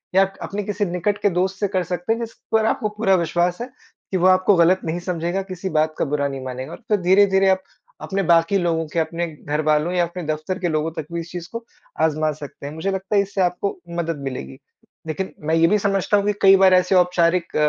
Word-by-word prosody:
या 195 - +7
क 195 - -12
अपने 205 +1 -4
किसी 205 +1 -2
निकट 180 +3 -1
के 205 - +3
दोस्त 190 +2 -1
से 205 - +1
कर 185 -2 -1
सकते 180 +5 -2
हैं 230 - -4
जिस 230 -1 -5 0.2
पर 220 -1 +3
आपको 215 -1 0
पूरा 210 -2 +2
विश्वास 175 0 0
है, 245 - -4 0.4
कि 190 - +1
वो 180 +1 +3
आपको 185 +1 +4
गलत 175 +2 +4
नहीं 165 +2 -2
समझेगा 175 +1 -2
किसी 185 +1 -4
बात 155 0 +1
का - - 0
बुरा 145 0 0
नहीं 135 -1 -6
मानेगा 130 +4 -6
और - - -8
फिर 210 - +2
धीरे-धीरे 190 +1 +4
आप 190 0 +2 0.4
अपने 195 0 -2
बाकी 170 +3 +3
लोगों 165 -3 0
के, 165 - -2
अपने 170 +2 -2
घरवालों 150 +2 -1
या 180 - +2
अपने 175 +1 -5
दफ़्तर 155 +4 -3
के 180 - -1
लोगों 155 +1 -1
तक 160 -2 -6
भी 170 - -2
इस 165 +1 -8
चीज़ 175 -1 -6
को 230 0 -6 0.4
आज़मा 155 -1 +1
सकते 145 -1 -10
हैं, 145 - -7
मुझे 190 +5 -2
लगता 195 +2 -3
है 200 - +5
इससे 200 0 -3
आपको 180 +2 -1 0.2
मदद 165 -2 -2
मिलेगी। 70 - -6 0.5
लेकिन 190 +4 -4
मैं 160 - +2
ये 165 0 +4
भी 210 - +3
समझता 200 +1 +1
हूँ 200 - 0
कि 210 - +2
कई 195 0 +8
बार 190 -1 +5
ऐसे 180 +1 +3
औपचारिक 180 -1 +2
180 Hz, 235 wpm, -21 LUFS, 160-195 Hz, 0.5 s, कई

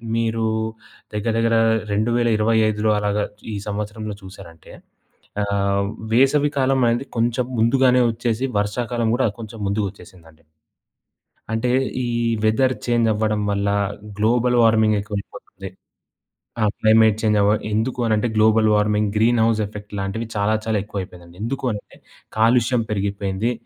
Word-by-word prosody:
మీరు 115 -1 0 0.7
దగ్గర, 110 +2 -1
దగ్గర 115 0 +2 0.4
2025లో 110 -1 +2
అలాగా 105 0 0 0.3
ఈ - - -3
సంవత్సరంలో 105 0 -4
చూశారంటే, 95 -4 -13 0.7
ఆహ్, 100 0 0 0.3
వేసవి 140 +4 +3
కాలమనేది 130 -1 +1
కొంచం 120 +2 0
ముందుగానే 125 +2 +4
ఒచ్చేసి, 120 +2 -2
వర్షాకాలం 115 +2 -1
గూడా 130 - +2
కొంచం 110 0 -9
ముందుగొచ్చేసిందండి. 95 -5 -6 1.1
అంటే, 115 +2 0 0.3
ఈ - - -2 0.4
వెదర్ 130 +4 +2
చేంజవ్వడం 110 -3 +1
వల్లా, 100 0 0 0.4
గ్లోబల్ 120 +3 +2
వార్మింగ్ 110 -1 +4
ఎక్కువైపోతుంది. 100 -1 -7 0.9
ఆ! - - +2
క్లైమేట్ 110 -1 +4
చేంజ్ 105 -1 +2
అవ 100 - +3 0.2
ఎందుకు 115 +4 -1
అనంటే, 110 +1 +1
global 110 0 +4
warming, 105 0 +1
green 115 +2 +3
house 115 -1 +1
effect 105 0 -11
లాంటివి 100 +4 -3
చాలా, 105 +1 +1
చాలా 110 -1 0
ఎక్కువయిపోయిందండి. 90 -4 -8
ఎందుకు 135 +4 -3
అంటే, 105 - -9 0.4
కాలుష్యం 120 +1 +3
పెరిగిపోయింది. 100 +2 -1
110 Hz, 115 wpm, -21 LUFS, 105-115 Hz, 1.1 s, ముందుగానే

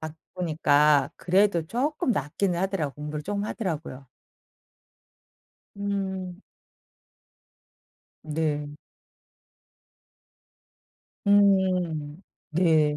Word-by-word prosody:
바꾸니까 155 -3 +1
그래도 180 -2 +2
쪼끔 265 - -1
낫기는 175 - -1
하더라고 185 -7 -1
공부를 150 0 -5
좀 205 +3 -2
하더라고요. 160 - -4 1.7
음. 190 -2 -3 1.8
네. 150 -1 -2 2.6
음 185 -6 +2 0.3
네. 155 -3 +3
170 Hz, 135 characters per minute, -26 LUFS, 150-195 Hz, 2.6 s, 네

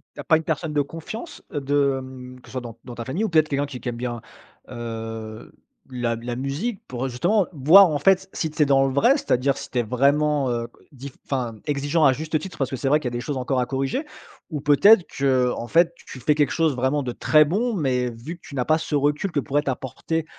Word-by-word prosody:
Tu - - -13
as - - -5
pas 160 - +4
une 160 - -5
personne 160 0 -2
de 145 - +2
confiance, 165 - -8
heu, 145 - -1
de, 140 0 +2
hem, 130 -1 -10
que - - -19
ce - - -13
soit 130 - -3
dans 115 -2 -9
dans 125 - -9
ta 120 - -5
famille 170 +12 -2
ou 215 - 0
peut-être 155 -2 +3
quelqu'un 140 0 0
qui 135 -3 -8
qui 125 - -4
aime 120 - -4
bien, 120 -1 -4 0.5
heu, 115 -2 -7 0.4
la 120 -2 -2
la 120 +1 -5
musique 145 - -3
pour, 125 +1 -4
heu, - - -2
justement 185 - +1
voir 170 +6 +7
en 150 -2 -1
fait, 190 +4 +3
si 160 - -2
tu 155 - -3
es - - +6
dans 135 -1 +4
le 130 - -3
vrai, 190 - +5
c'est-à-dire, 135 - 0
si - - -8
tu 125 - 0
es - - +1
vraiment, 140 +3 +2
heu, 120 -1 -2
q - - -26
dif 135 0 -10
enfin, 125 -5 -2
exigeant 145 +2 +1
à 135 - +6
juste 155 +3 -2
titre, 190 +1 -9
parce 135 - 0
que - - -3
c'est 135 +1 -3
vrai 150 +2 +4
qu'il 140 - -4
y - - -11
a 120 - -2
des - - -4
choses 140 +1 -4
encore 130 0 -1
à 125 - +1
corriger, 135 - -2 0.5
ou 150 -3 -3
peut-être, 170 +7 +6
qu'en 130 -3 +1
fait, 170 +3 +3
tu 135 - -12
fais 145 +4 +2
quelque 145 -2 +2
chose 160 -4 +1
vraiment 130 +4 0
de 125 -3 -3
très 155 +5 +4
bon, 220 +10 0
mais 125 - 0
vu 120 +10 -8
que 170 - -24
tu - - -12
n'as 125 - -1
pas 155 - +3
ce 160 -1 -6
recul 145 +6 0
que 145 - 0
pourrait 145 +2 0
t'apporter, 140 +4 -3
140 Hz, 260 wpm, -23 LUFS, 125-155 Hz, 0.5 s, voir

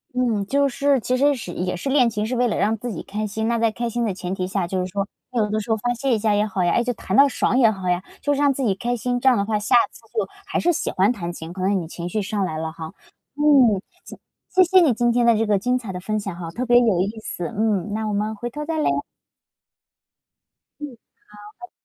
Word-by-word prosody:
嗯， 235 -5 +1
就 280 +4 +2
是 275 +1 +1
其 250 +2 -1
实 285 +2 +3
实 225 -8 -7
也 180 0 -2
是 180 - -6
练 260 -3 +4
琴 210 -1 -2
是 245 +3 -2
为 245 0 +2
了 220 - -1
让 210 +4 +1
自 240 +2 -5
己 180 - -6
开 215 +2 -4
心。 220 +2 -3
那 235 0 +1
在 225 -1 +2
开 235 +2 -3
心 240 +1 -2
的 220 - 0
前 180 0 -5
提 185 -1 -3
下， 190 -1 -1
就 185 +2 -2
是 180 - -1
说， 200 +1 -2 0.3
有 225 -4 +1
的 215 - 0
时 215 - -7
候 220 - +2
发 245 +3 -1
泄 255 +1 0
一 - - 0
下 215 0 +1
也 205 +1 +2
好 190 -3 -1
呀， 175 - +2
诶， 240 - +2
就 245 - -1
弹 195 -3 -4
到 275 +3 +7
爽 255 - 0
也 230 -4 +6
好 190 -4 -4
呀， 180 0 +1 0.2
就 290 - 0
是 280 - -2
让 290 -1 +4
自 270 0 -3
己 215 -6 +2
开 240 +5 -2
心， 245 +1 -2
这 265 - +4
样 250 - +3
的 200 - 0
话 215 0 0
下 205 +3 +2 0.2
次 - - -16 0.2
就 - - +1 0.2
还 390 - -1
是 350 - +2
喜 - - -2
欢 195 +4 +2
弹 175 -8 -4
琴， 165 0 -8
可 185 - -7
能 195 +1 +1
你 165 - -6
情 175 +1 -6
绪 210 +3 -2
上 205 0 -2
来 160 -4 -3
了 160 0 -3
哈。 160 0 -8 0.4
嗯， 280 -8 +5 0.7
谢 370 - +5
谢 370 +1 +5
谢 - - +8
你 270 - +4
今 240 +1 +1
天 240 0 +2
的 235 -1 +5
这 225 - +1
个 210 -2 +2
精 250 +6 0
彩 230 -6 -5
的 180 - -5
分 215 +4 -2
享 195 -3 -5
哈， 175 -1 -6
特 250 - -3
别 240 -1 +5
有 220 -7 +3
意 205 +4 -2
思。 175 -5 -5
嗯， 210 0 -1
那 220 +1 -2
我 210 - -2
们 210 +2 -1
回 240 +4 -4
头 295 +5 -6
再 320 +1 -3
聊。 305 - +1 1.9
嗯， 290 -4 -7 0.6
好， 360 - -9
拜 - - -45
220 Hz, 300 characters per minute, -22 LUFS, 195-250 Hz, 1.9 s, 谢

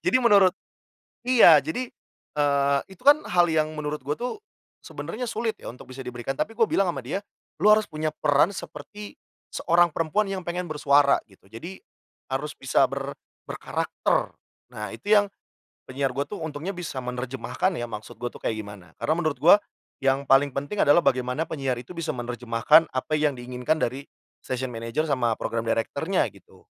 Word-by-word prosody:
Jadi, - - +4
menurut 200 -5 +6 0.7
iya. 220 - +8
Jadi, 235 - -4 0.5
eee, 140 -1 +3
itu 190 - -15
kan 290 +2 +7
hal 175 -1 +4
yang 155 -1 +2
menurut 150 -1 -3
gue 145 +3 -2
tuh, 250 - -4 0.4
sebenarnya 250 +3 -6
sulit 230 -1 -1
ya, - - -7
untuk 125 - -11
bisa 135 - -7
diberikan 125 +1 -4
tapi 225 - -2
gue 230 - +5
bilang 195 -2 +2
sama 135 -6 -4
dia, 190 +10 -3 0.4
"Lu 210 - +6
harus 215 0 +5
punya 155 0 -2
peran 145 +5 +4
seperti 205 +7 -9 0.4
seorang 170 0 +3
perempuan 165 +7 +1
yang 195 -1 -3
pengen 180 +1 -2
bersuara." 145 -2 +4
Gitu. 95 - -23
Jadi, 170 +12 -8 0.6
harus 150 +3 -2
bisa 135 - +1
ber 135 +1 -4 0.4
berkarakter. - - -1 0.4
Nah, 105 -1 -5
itu 200 - -8
yang 205 -1 +6 0.6
penyiar 135 +1 -1
gue 140 - 0
tuh 205 - -7
untungnya 155 +4 -4
bisa 175 -6 -6
menerjemahkan 125 +7 -2
ya 120 - -3
maksud 110 +1 -8
gue 120 - -2
tuh - - -12
kayak 110 - -1
gimana. 100 -5 -11
Karena 155 - +1
menurut 155 -4 0
gue 165 - +7 0.5
yang 135 +1 +1
paling 135 +1 +5
penting 145 +9 -3
adalah 145 +4 +6
bagaimana 125 +4 +1
penyiar 135 -5 -2
itu 120 +7 -9
bisa 165 - -4
menerjemahkan 120 +6 +3
apa 130 +4 -3
yang 150 -3 +1
diinginkan 125 +4 -2
dari 130 +4 -2 0.4
station 130 0 -4
manager 115 +6 -2
sama 120 -5 +1
program 115 0 -3
director-nya 140 +11 0
gitu. 100 -3 -20
145 Hz, 170 wpm, -25 LUFS, 125-175 Hz, 0.7 s, iya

